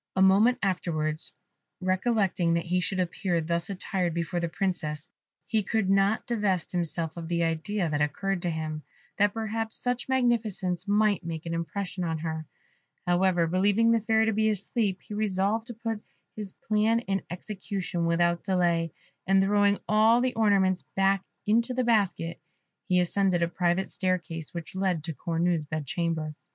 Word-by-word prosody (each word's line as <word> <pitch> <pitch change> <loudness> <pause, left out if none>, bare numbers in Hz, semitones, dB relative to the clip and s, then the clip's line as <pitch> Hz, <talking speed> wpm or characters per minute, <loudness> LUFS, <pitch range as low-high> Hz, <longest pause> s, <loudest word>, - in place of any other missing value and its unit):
A 190 - +2
moment 205 +6 +5
afterwards, 155 -5 -1 0.5
recollecting 185 -2 +1
that 170 - -1
he 180 +1 +1
should 190 +1 -1
appear 180 0 0
thus 170 +2 -1
attired 185 -3 -2
before 170 +1 -1
the 170 -1 -1
Princess, 160 -5 -2 0.4
he 220 -1 +1
could 205 -1 0
not 195 +2 +2
divest 205 -7 0
himself 170 -2 -2
of 165 -1 -5
the 170 0 0
idea 165 +4 -1
that 150 -1 -1
occurred 190 +5 -1
to 175 - -1
him, 155 -1 -3 0.4
that 205 +1 +3
perhaps 225 0 -3
such 245 0 -2
magnificence 220 -8 0
might 205 -1 +2
make 165 -1 -5
an 165 - -3
impression 180 +3 -3
on 165 -2 -1
her. 160 -1 -4 0.6
However, 175 -1 +3
believing 200 +6 +3
the 230 - +4
Fairy 220 0 +2
to 220 - +1
be 220 +1 +2
asleep, 205 -1 -1
he - - -9
resolved 210 +2 0
to 240 - -7
put 225 -1 -4 0.3
his 210 -3 -6
plan 220 +2 +1
in 195 -4 -1
execution 185 -2 -3
without 170 0 +2
delay, 170 -3 +1 0.3
and 195 0 +5
throwing 205 +1 +3
all 220 +2 +5
the 255 0 +1
ornaments 195 -4 +3
back 195 0 +3 0.2
into 235 +4 +2
the 255 - +1
basket, 200 -7 +1 0.5
he 180 -2 +3
ascended 180 0 +2
a - - +2
private 175 +2 0
staircase 170 -4 -2
which 170 -2 -7
led 185 -4 0
to 165 0 -3
Cornue's 165 0 0
bed 155 0 -4
chamber. 160 0 -2
185 Hz, 165 wpm, -28 LUFS, 170-210 Hz, 0.6 s, moment